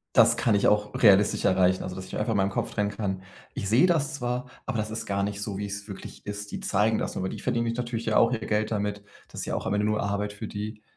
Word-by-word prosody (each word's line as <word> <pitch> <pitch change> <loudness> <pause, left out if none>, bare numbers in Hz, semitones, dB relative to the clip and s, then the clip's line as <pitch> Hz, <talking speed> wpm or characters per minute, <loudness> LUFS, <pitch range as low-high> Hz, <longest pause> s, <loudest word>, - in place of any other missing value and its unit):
„das - - +7
kann 115 - +2
ich 100 - +3
auch 105 0 +2
realistisch 100 -2 +5
erreichen.“ 95 0 +3
Also, 90 - -5
dass 95 0 -7
ich - - -7
einfach 115 +2 0
in - - +1
meinem 95 0 +2
Kopf - - -2
trennen 105 -1 0
kann: 100 -2 -3 0.3
„Ich 100 - -3
sehe 120 - +5
das 155 -4 +1
zwar, 125 -2 -2 0.2
aber 125 - -2
das 110 0 -2
ist 110 - -4
gar 100 0 0
nicht 100 0 -2
so, 100 -1 -3
wie 105 - -2
es 100 +1 -6
wirklich 100 - -9
ist. 105 0 -5
Die - - -4
zeigen 105 +3 +2
das - - -2
nur“, - - -3
aber 95 - -1
die - - -6
verdienen 115 0 0
sich 115 0 -1
natürlich 120 -2 -3
ja 110 - +1
auch 115 - +5
ihr 115 - -1
Geld 105 0 0
damit, 105 -1 -2 0.2
das - - -7
ist - - -3
ja - - -2
auch - - -3
am - - 0
Ende 105 0 +1
nur 105 0 +1
Arbeit 100 +1 -1
für 105 +1 -6
die. 105 +1 -6
105 Hz, 290 wpm, -27 LUFS, 100-115 Hz, 0.3 s, das